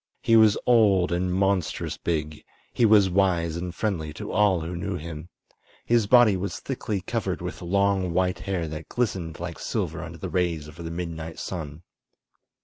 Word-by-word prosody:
He 115 Hz, -, +4 dB
was 110 Hz, -2 st, +6 dB
old 100 Hz, -7 st, +4 dB
and 90 Hz, +1 st, 0 dB
monstrous 95 Hz, -2 st, 0 dB
big; 75 Hz, -2 st, -3 dB, 0.3 s
he 115 Hz, -, +4 dB
was 105 Hz, -2 st, +6 dB
wise 90 Hz, -3 st, +1 dB
and 90 Hz, +1 st, -4 dB
friendly 85 Hz, -8 st, -2 dB
to -, -, -7 dB
all 100 Hz, -5 st, +3 dB
who 85 Hz, +2 st, -5 dB
knew 90 Hz, +3 st, -3 dB
him. 80 Hz, 0 st, -7 dB, 0.6 s
His 115 Hz, -3 st, +2 dB
body 120 Hz, -3 st, +6 dB
was 95 Hz, +2 st, -4 dB
thickly 110 Hz, -7 st, -3 dB
covered 100 Hz, -2 st, -2 dB
with 90 Hz, +1 st, -6 dB
long, 95 Hz, 0 st, +1 dB
white 90 Hz, 0 st, 0 dB
hair 90 Hz, -3 st, -2 dB
that 80 Hz, +1 st, -7 dB
glistened 95 Hz, -10 st, -2 dB
like 85 Hz, -3 st, -6 dB
silver -, -, -3 dB
under -, -, -8 dB
the -, -, -5 dB
rays 85 Hz, -4 st, -1 dB
of 75 Hz, +1 st, -13 dB
the 80 Hz, -, -5 dB
midnight 80 Hz, -1 st, -5 dB
sun. 80 Hz, -3 st, -6 dB
90 Hz, 170 wpm, -25 LUFS, 85-100 Hz, 0.6 s, was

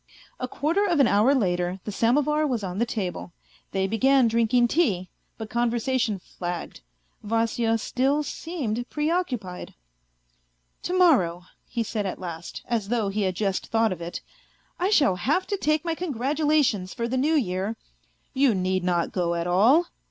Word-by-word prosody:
A 255 Hz, -, -2 dB
quarter 320 Hz, +10 st, 0 dB
of 340 Hz, -5 st, +1 dB
an 275 Hz, -, +6 dB
hour 220 Hz, +8 st, +4 dB
later 180 Hz, -5 st, 0 dB
the 210 Hz, -, -5 dB
samovar 295 Hz, +8 st, +2 dB
was 240 Hz, -6 st, -2 dB
on 185 Hz, 0 st, -4 dB
the 235 Hz, -, +1 dB
table. 180 Hz, -, -4 dB, 0.4 s
They 190 Hz, 0 st, 0 dB
began 255 Hz, +5 st, +3 dB
drinking 235 Hz, +1 st, +2 dB
tea, 200 Hz, -, +1 dB, 0.3 s
but 220 Hz, -1 st, -7 dB
conversation 235 Hz, -1 st, 0 dB
flagged. 175 Hz, -, -6 dB, 0.4 s
Vasya 225 Hz, +1 st, 0 dB
still 270 Hz, +6 st, 0 dB
seemed 270 Hz, -7 st, -4 dB
preoccupied. 295 Hz, -, -2 dB, 0.5 s
" -, -, -44 dB
To 365 Hz, -, 0 dB
morrow," 185 Hz, -, +3 dB, 0.2 s
he 235 Hz, -2 st, -2 dB
said 210 Hz, -2 st, -3 dB
at 185 Hz, -, -4 dB
last, 170 Hz, -2 st, -7 dB
as 225 Hz, -4 st, -1 dB
though 225 Hz, -4 st, 0 dB
he 210 Hz, +2 st, -2 dB
had 185 Hz, -2 st, 0 dB
just 195 Hz, -2 st, -1 dB
thought 225 Hz, -1 st, +2 dB
of 170 Hz, -, -10 dB
it, 170 Hz, +1 st, -5 dB, 0.6 s
"I 365 Hz, +2 st, +1 dB
shall 280 Hz, -, +3 dB
have 300 Hz, -, +1 dB
to 405 Hz, -, -2 dB
take 305 Hz, -2 st, 0 dB
my 335 Hz, -, 0 dB
congratulations 290 Hz, -, 0 dB
for 235 Hz, -, -2 dB
the 250 Hz, -, -2 dB
New 295 Hz, +5 st, +2 dB
Year.. 200 Hz, -4 st, -1 dB, 0.2 s
." -, -, -40 dB
" -, -, -42 dB
You 260 Hz, -6 st, +5 dB
need 185 Hz, 0 st, 0 dB
not 175 Hz, -2 st, 0 dB
go 170 Hz, -2 st, 0 dB
at 170 Hz, 0 st, -2 dB
all." 225 Hz, -, +4 dB
225 Hz, 170 wpm, -25 LUFS, 185-280 Hz, 0.6 s, an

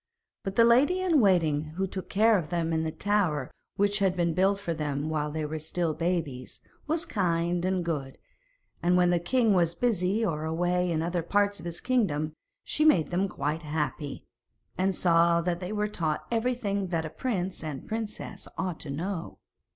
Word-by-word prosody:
But 195 Hz, -2 st, -5 dB
the 230 Hz, -, +6 dB
lady 265 Hz, +10 st, +4 dB
in 355 Hz, -5 st, +3 dB
waiting 155 Hz, -6 st, +2 dB
who 190 Hz, +2 st, 0 dB
took 190 Hz, 0 st, -6 dB
care 220 Hz, +2 st, +4 dB
of 170 Hz, -6 st, -1 dB
them 170 Hz, -2 st, -1 dB
in 160 Hz, 0 st, +1 dB
the 160 Hz, -, -2 dB
tower 180 Hz, -9 st, 0 dB, 0.2 s
which 205 Hz, +1 st, +2 dB
had 190 Hz, -2 st, +2 dB
been 170 Hz, -2 st, +1 dB
built 190 Hz, +3 st, +3 dB
for 175 Hz, -4 st, -2 dB
them 150 Hz, -1 st, -2 dB
while 150 Hz, -1 st, -1 dB
they 155 Hz, 0 st, -3 dB
were 155 Hz, +1 st, -4 dB
still 160 Hz, +1 st, -1 dB
babies, 160 Hz, -7 st, -3 dB, 0.3 s
was 320 Hz, +2 st, 0 dB
kind 175 Hz, -, 0 dB
and 185 Hz, -2 st, 0 dB
good, 140 Hz, -5 st, -3 dB, 0.6 s
and 175 Hz, +1 st, +3 dB
when 180 Hz, 0 st, +4 dB
the 175 Hz, -, +3 dB
king 225 Hz, +5 st, +2 dB
was 170 Hz, -2 st, +2 dB
busy 210 Hz, 0 st, +1 dB
or 155 Hz, -5 st, -2 dB
away 175 Hz, +2 st, 0 dB
in 160 Hz, -1 st, 0 dB
other 175 Hz, +1 st, -1 dB
parts 205 Hz, +4 st, +1 dB
of -, -, -10 dB
his 170 Hz, -1 st, -5 dB
kingdom 160 Hz, -, 0 dB, 0.3 s
she 305 Hz, -, 0 dB
made 180 Hz, -, +4 dB
them 190 Hz, +3 st, +1 dB
quite 150 Hz, +2 st, -2 dB
happy, 150 Hz, -2 st, -3 dB, 0.5 s
and 190 Hz, 0 st, +1 dB
saw 170 Hz, -1 st, +4 dB
that 170 Hz, 0 st, -1 dB
they 180 Hz, +1 st, -5 dB
were 210 Hz, 0 st, 0 dB
taught 160 Hz, -7 st, -2 dB
everything 225 Hz, -4 st, 0 dB
that 165 Hz, -2 st, -1 dB
a -, -, -4 dB
prince 190 Hz, -8 st, -2 dB
and 150 Hz, -4 st, -6 dB
princess 215 Hz, -2 st, -5 dB
ought 185 Hz, -4 st, -2 dB
to 150 Hz, -, -8 dB
know. 165 Hz, +5 st, -4 dB
175 Hz, 190 wpm, -28 LUFS, 160-200 Hz, 0.6 s, the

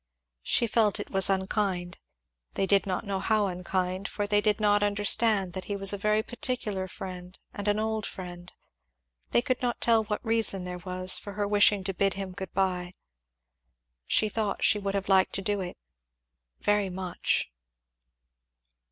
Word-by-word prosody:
She 235 Hz, -, +1 dB
felt 220 Hz, -2 st, +2 dB
it -, -, -7 dB
was 195 Hz, -1 st, +3 dB
unkind 190 Hz, -2 st, -1 dB, 0.6 s
they 195 Hz, -, +1 dB
did 200 Hz, -1 st, +2 dB
not 185 Hz, -1 st, -2 dB
know 195 Hz, -1 st, -2 dB
how 215 Hz, +1 st, +1 dB
unkind, 185 Hz, +1 st, -2 dB
for 205 Hz, -, -3 dB
they 205 Hz, 0 st, +2 dB
did 210 Hz, 0 st, +1 dB
not 205 Hz, -1 st, +3 dB
understand 205 Hz, -1 st, +3 dB
that 185 Hz, -, -5 dB
he 205 Hz, -, -3 dB
was 195 Hz, 0 st, +1 dB
a -, -, 0 dB
very 215 Hz, +1 st, +1 dB
particular 220 Hz, -6 st, -1 dB
friend 180 Hz, -1 st, -8 dB, 0.2 s
and 205 Hz, 0 st, -5 dB
an 205 Hz, 0 st, +2 dB
old 220 Hz, 0 st, -2 dB
friend 175 Hz, -1 st, -9 dB, 0.8 s
they 240 Hz, -, +2 dB
could 255 Hz, -2 st, -1 dB
not 245 Hz, -1 st, -1 dB
tell 225 Hz, -2 st, +3 dB
what 210 Hz, +2 st, -4 dB
reason 225 Hz, -4 st, +3 dB
there 180 Hz, 0 st, -6 dB
was 185 Hz, +1 st, +2 dB
for 205 Hz, -, -9 dB
her 205 Hz, 0 st, -2 dB
wishing 205 Hz, -1 st, +3 dB
to 195 Hz, +1 st, -3 dB
bid 195 Hz, +1 st, +1 dB
him 195 Hz, -1 st, -5 dB
good 190 Hz, +1 st, -7 dB
bye. 180 Hz, -2 st, -1 dB, 1.1 s
She 215 Hz, -, +2 dB
thought 210 Hz, -1 st, -2 dB
she 210 Hz, -, +4 dB
should 200 Hz, 0 st, -2 dB
have 195 Hz, 0 st, -2 dB
liked 190 Hz, -1 st, +3 dB
to 195 Hz, -, 0 dB
do 205 Hz, 0 st, 0 dB
it, 180 Hz, -, -6 dB, 0.8 s
very 205 Hz, -1 st, +1 dB
much. 180 Hz, -, -2 dB
200 Hz, 170 wpm, -27 LUFS, 185-210 Hz, 1.1 s, she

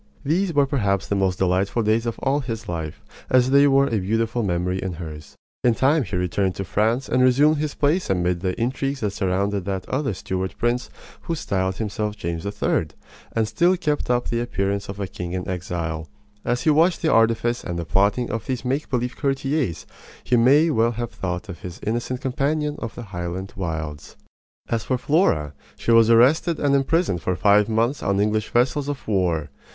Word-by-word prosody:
These 175 Hz, +5 st, +1 dB
were 145 Hz, -1 st, +5 dB
perhaps 100 Hz, -9 st, 0 dB
the -, -, -1 dB
most 95 Hz, -2 st, +1 dB
delightful 95 Hz, +5 st, +1 dB
days 110 Hz, +2 st, +1 dB
of 115 Hz, -, -3 dB
all 140 Hz, +2 st, +2 dB
his 115 Hz, -5 st, -5 dB
life, 80 Hz, -4 st, -5 dB, 0.3 s
as 130 Hz, 0 st, +4 dB
they 140 Hz, +1 st, +6 dB
were 135 Hz, 0 st, +4 dB
a 115 Hz, -5 st, 0 dB
beautiful 115 Hz, +5 st, 0 dB
memory 90 Hz, -1 st, -1 dB
in 95 Hz, -2 st, -3 dB
hers. 80 Hz, -3 st, -9 dB, 0.3 s
In 120 Hz, -2 st, +4 dB
time 145 Hz, +6 st, +3 dB
he 100 Hz, -6 st, -4 dB
returned 90 Hz, +1 st, 0 dB
to 95 Hz, -, -3 dB
France 110 Hz, +7 st, 0 dB
and 125 Hz, -, +2 dB
resumed 140 Hz, +5 st, +4 dB
his 150 Hz, 0 st, -2 dB
place 155 Hz, +6 st, +1 dB
amid 90 Hz, -2 st, +1 dB
the 90 Hz, +1 st, -2 dB
intrigues 135 Hz, +3 st, -1 dB
that 105 Hz, -2 st, 0 dB
surrounded 100 Hz, 0 st, -1 dB
that 95 Hz, -2 st, -3 dB
other 135 Hz, -5 st, -1 dB
Stuart 95 Hz, +1 st, -4 dB
prince 120 Hz, +1 st, 0 dB, 0.3 s
who 165 Hz, -, -3 dB
styled 95 Hz, -10 st, -1 dB
himself 105 Hz, 0 st, -3 dB
James 85 Hz, 0 st, -4 dB
III., 100 Hz, -5 st, 0 dB, 0.5 s
and 110 Hz, -1 st, +1 dB
still 175 Hz, +9 st, +2 dB
kept 150 Hz, -7 st, -1 dB
up 120 Hz, 0 st, +1 dB
the 115 Hz, -, 0 dB
appearance 100 Hz, -4 st, -2 dB
of 100 Hz, 0 st, -6 dB
a 100 Hz, -, -1 dB
king 90 Hz, -1 st, -6 dB
in 90 Hz, -1 st, -3 dB
exile. 85 Hz, -3 st, -3 dB, 0.4 s
As 125 Hz, +1 st, -1 dB
he 155 Hz, -, +4 dB
watched 165 Hz, +4 st, +3 dB
the 160 Hz, -, +3 dB
artifice 115 Hz, +1 st, +2 dB
and 85 Hz, -1 st, -4 dB
the 85 Hz, -, -3 dB
plotting 100 Hz, +7 st, +1 dB
of 115 Hz, -, -4 dB
these 125 Hz, -2 st, -3 dB
make 135 Hz, +4 st, -1 dB
believe 125 Hz, -1 st, -1 dB
courtiers 135 Hz, -, -1 dB, 0.4 s
he 125 Hz, -, +1 dB
may 140 Hz, +7 st, +5 dB
well 115 Hz, -3 st, +2 dB
have 120 Hz, 0 st, -4 dB
thought 90 Hz, +2 st, -4 dB
of 95 Hz, -4 st, -8 dB
his 90 Hz, 0 st, -8 dB
innocent 120 Hz, +3 st, -2 dB
companion 145 Hz, +3 st, -1 dB
of 115 Hz, -3 st, -6 dB
the 120 Hz, -, -7 dB
Highland 95 Hz, -1 st, -5 dB
wilds. 80 Hz, -5 st, -5 dB, 0.5 s
As 115 Hz, -2 st, -1 dB
for 130 Hz, -, 0 dB
Flora, 120 Hz, -, +1 dB, 0.2 s
she -, -, -1 dB
was 115 Hz, -1 st, +6 dB
arrested 140 Hz, +9 st, +4 dB
and 145 Hz, -1 st, +2 dB
imprisoned 140 Hz, -, +1 dB
for 90 Hz, -, -1 dB
five 105 Hz, +2 st, +4 dB
months 115 Hz, +5 st, +1 dB
on 100 Hz, 0 st, 0 dB
English 110 Hz, +1 st, 0 dB
vessels 130 Hz, +4 st, +1 dB
of 145 Hz, -, -5 dB
war. 90 Hz, -7 st, 0 dB
115 Hz, 195 wpm, -23 LUFS, 95-130 Hz, 0.5 s, they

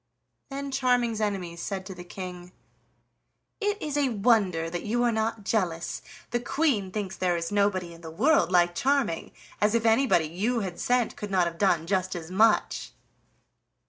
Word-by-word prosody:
Then 280 Hz, 0 st, -5 dB
Charming's 245 Hz, -4 st, +1 dB
enemies 180 Hz, -5 st, -2 dB
said 190 Hz, 0 st, -4 dB
to 190 Hz, -, -7 dB
the 175 Hz, -1 st, -9 dB
King: 180 Hz, 0 st, -8 dB, 1.1 s
"It 415 Hz, 0 st, 0 dB
is 300 Hz, -7 st, -3 dB
a 280 Hz, -2 st, +2 dB
wonder 200 Hz, -7 st, +2 dB
that 170 Hz, +1 st, -4 dB
you 240 Hz, +3 st, 0 dB
are 240 Hz, -, +3 dB
not 220 Hz, -1 st, -1 dB
jealous, 180 Hz, -6 st, -1 dB, 0.3 s
the 240 Hz, -, +1 dB
Queen 240 Hz, -6 st, 0 dB
thinks 200 Hz, -2 st, -4 dB
there 180 Hz, -2 st, +1 dB
is 170 Hz, +1 st, -3 dB
nobody 195 Hz, -4 st, +1 dB
in 165 Hz, -, -14 dB
the 165 Hz, -, -8 dB
world 220 Hz, -, +3 dB
like 175 Hz, -1 st, +4 dB
Charming. 260 Hz, -6 st, 0 dB, 0.3 s
As 210 Hz, +2 st, +3 dB
if 230 Hz, 0 st, +1 dB
anybody 225 Hz, -7 st, +4 dB
you 215 Hz, +9 st, -1 dB
had 185 Hz, -3 st, -5 dB
sent 245 Hz, -1 st, +1 dB
could 210 Hz, -, -6 dB
not 185 Hz, -2 st, +3 dB
have 170 Hz, 0 st, -5 dB
done 175 Hz, -5 st, +2 dB
just 185 Hz, 0 st, 0 dB
as 170 Hz, 0 st, -7 dB
much!" 215 Hz, +3 st, +2 dB
200 Hz, 175 wpm, -27 LUFS, 175-240 Hz, 1.1 s, like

